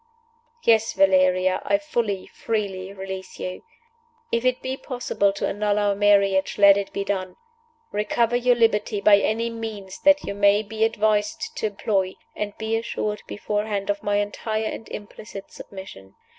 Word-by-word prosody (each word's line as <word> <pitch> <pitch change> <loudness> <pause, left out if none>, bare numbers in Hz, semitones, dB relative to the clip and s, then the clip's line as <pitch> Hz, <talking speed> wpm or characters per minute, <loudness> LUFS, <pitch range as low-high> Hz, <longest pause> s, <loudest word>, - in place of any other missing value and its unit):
"Yes, 225 0 +3
Valeria, 185 -1 +3
I 300 - +2
fully, 235 -10 -2
freely 195 -4 -3
release 190 -1 -7
you. 185 - -5 0.7
If 235 0 +1
it 255 0 +1
be 260 0 -2
possible 245 -7 -1
to - - -2
annul 205 0 0
our 205 -1 +2
marriage, 200 -1 +3
let 200 -1 +8
it 200 -1 -3
be 200 - -2
done. 190 -2 -3 0.6
Recover 230 +3 +1
your 245 0 +3
liberty 215 -3 +2
by 205 0 +6
any 230 +3 0
means 215 -4 -7
that 290 -1 +5
you - - -4
may 200 +1 +4
be 220 +1 -2
advised 225 - +1
to - - 0
employ; 195 -2 -1 0.2
and 205 -1 -4
be 220 0 -1
assured 215 -2 -3
beforehand 205 -1 -2
of 200 - -4
my 205 0 0
entire 215 +2 -1
and 220 - -5
implicit 205 -1 -9
submission. 190 - -11
205 Hz, 155 wpm, -24 LUFS, 195-225 Hz, 0.7 s, let